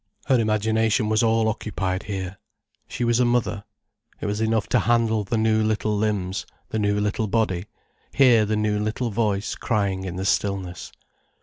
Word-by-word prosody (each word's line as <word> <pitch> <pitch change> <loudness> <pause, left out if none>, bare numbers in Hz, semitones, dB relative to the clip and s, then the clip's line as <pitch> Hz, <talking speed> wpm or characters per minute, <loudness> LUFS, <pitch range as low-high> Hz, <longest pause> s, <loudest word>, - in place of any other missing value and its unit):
Her 130 -3 +3
imagination 110 +1 +1
was 110 +1 +2
all 115 -1 +2
occupied 100 -3 -2
here. 95 -2 -5 0.5
She 120 - -4
was 120 0 +2
a - - +4
mother. 120 -4 0 0.5
It - - -5
was 105 +1 -2
enough 110 -1 +1
to - - +3
handle 115 -2 +2
the 110 +3 -2
new 110 0 +2
little 110 0 0
limbs, 100 -3 -1 0.3
the 110 - -2
new 105 0 +1
little 105 +1 -1
body, 100 -4 0 0.5
hear 125 -5 +5
the 105 +1 0
new 105 -1 0
little 110 +3 -2
voice 105 -2 0
crying 100 -4 -1
in 90 -2 -5
the 95 +1 -3
stillness. 95 -4 -1
110 Hz, 170 wpm, -24 LUFS, 100-110 Hz, 0.5 s, hear